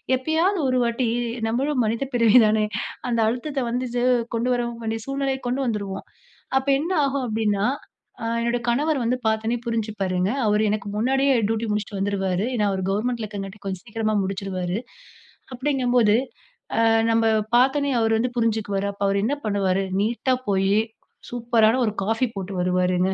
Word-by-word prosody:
எப்பயாவது 325 +8 +1
ஒரு 255 0 +2
வாட்டி 235 +1 0 0.4
நம்மளும் 260 +3 0
மனித 230 +5 -1
பிறவி 230 0 +5
தானே? 215 0 +2 0.4
அந்த 235 -1 0
அழுத்தத்த 270 +5 -2
வந்தது 245 0 -2 0.3
கொண்டு 240 +2 0
வரவு 240 -1 -1
வேண்டிய 225 0 -2
சூழ்நிலைய 275 -1 -1
கொண்டு 255 +3 -1
வந்துருவோம். 200 -4 -3 0.5
அப்போ 265 +1 -1
என்ன 335 +5 -2
ஆகும் 275 -2 0
அப்டின்னா, 210 -2 0 0.6
ஆ - - -3 0.2
என்னுடைய 235 0 0
கணவர் 290 +4 +1
வந்து 250 +2 +1
பாத்தொனே 220 +2 +1
புரிஞ்சு 225 -2 -1
பாருங்க. 185 0 +1 0.2
அவரு 210 0 +3
எனக்கு 210 -1 -2
முன்னாடியே 270 +5 +2
டியூட்டி 225 +1 -1
முடிச்சுட்டு 210 -1 -3
வந்துருவாரு. 195 0 0
ஏன்னா 210 -3 +1
அவரு 190 -1 -2
கவர்ன்மென்ட்ல 225 +3 -1
இருக்குறனாடிக்கும் 200 0 -8
கொஞ்சம் 190 +2 -5
சீக்கிரமா 215 -1 -1
முடிச்சுருவாரு. 190 -1 -3 0.8
அப்டிங்கும் 255 -1 0
போது 215 -2 +5 1.0
நம்ம 225 0 +3 0.3
பாத்தொனே 275 +3 +3
அவர் 225 0 +2
வந்து 250 +2 0
புரிஞ்சுக்குவாரு. 210 -3 0
அப்போ 200 0 -4
அவர் 200 0 +1
என்ன 275 +6 +1
பண்ணுவாரு? 195 -2 +1 0.2
நீட்டா 240 +4 +1
போய் 195 0 +2 0.6
சூப்பரான 235 0 +2
ஒரு 215 - -2
காஃபி 225 +4 +1
போட்டு 195 0 -5
வருவாருங்க. 180 0 +1
225 Hz, 150 wpm, -23 LUFS, 200-250 Hz, 1.0 s, பிறவி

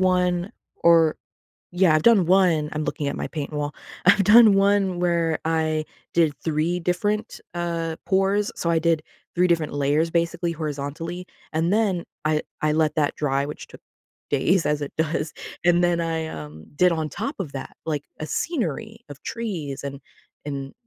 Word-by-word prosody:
one, 180 0 +1 0.2
or 165 -2 +4 0.6
yeah, 180 -2 +4
I've 155 - +1
done 220 -6 +6
one- 175 -4 +3
I'm 155 0 -2
looking 150 -2 -2
at - - -2
my - - -3
paint 150 -2 -5
wall- 145 -1 -3 0.3
I've 195 +2 +6
done 215 +1 +8
one 195 -2 +2
where 170 -2 +1
I 160 -1 +1 0.3
did 165 -3 +3
3 165 +2 0
different, 205 +6 -1
uh, 170 -1 -2
pours. 195 +2 +2
So, 170 - -2
I 165 -1 +3
did 165 -1 +2 0.3
3 180 +1 +3
different 165 -3 +1
layers, 145 +3 +1
basically, 170 0 0
horizontally, 155 +4 -5 0.2
and 165 +4 +1
then 200 -5 +1 0.2
I 155 0 +1 0.2
I 155 - +2
let 155 0 +1
that 150 -2 +1
dry, 140 -2 0
which 150 - -8
took - - -14 0.5
days 165 +6 +2
as 150 0 0
it 145 - -5
does. 155 -1 -1 0.3
And 175 0 +4
then 175 -1 +2
I, 165 -1 -1
um, 75 - -9
did 180 +4 +4
on 160 -2 -1
top 280 - -4
of 170 -8 -4
that, 135 - -7
like, 150 -3 -2 0.2
a 155 - -3
scenery 225 - -3
of 145 0 -10
trees, 180 - -4
and 140 -1 -5 0.5
and 140 -2 -5
165 Hz, 170 wpm, -24 LUFS, 150-180 Hz, 0.6 s, done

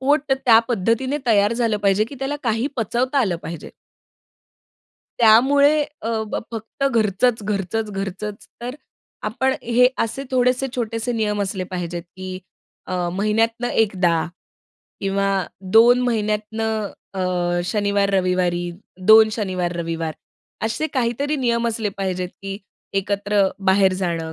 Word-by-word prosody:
पोट 285 +1 +2
त्या 245 -4 +5
पद्धतीने 240 +6 0
तयार 205 -2 +4
झालं 230 -2 +1
पाहिजे, 200 +1 +2
की 260 - -10
त्याला 275 +2 -2
काही 225 +2 +1
पचवता 250 +4 0
आलं 190 -8 +1
पाहिजे. 165 -2 -7 1.5
त्यामुळे 280 +7 +5 0.2
अ, 225 - -3 0.2
ब - - 0 0.2
फक्त 225 +5 -4
घरचंच, 220 0 +1
घरचंच, 210 +2 -2
घरचंच. 200 +1 -5 0.2
तर 250 +2 -4 0.5
आपण 265 +5 0
हे 245 +2 +4
असे 270 +5 -2
थोडेसे 255 +1 +2
छोटेसे 230 0 -2
नियम 210 -2 0
असले 190 -1 -3
पाहिजेत, 175 -1 -4
की 185 0 -6 0.5
अ, 180 -2 -1
महिन्यातनं 225 +4 0
एकदा. 180 -6 +1 0.7
किंवा 195 0 0 0.5
2 240 +2 +7
महिन्यातनं 220 -2 -1 0.2
अ, 190 - -3 0.4
शनिवार, 200 0 +1
रविवारी, 180 -2 +1 0.4
2 220 0 +9
शनिवार 185 -5 -2
रविवार, 165 -2 -3 0.5
असे 230 +8 -1
काहीतरी 270 +4 0
नियम 235 -3 +1
असले 220 -2 -2
पाहिजेत, 185 -2 -2
की 195 0 -5 0.4
एकत्र 200 +1 0 0.3
बाहेर 190 0 +5
जाणं 165 -3 -2
215 Hz, 125 wpm, -21 LUFS, 195-240 Hz, 1.5 s, 2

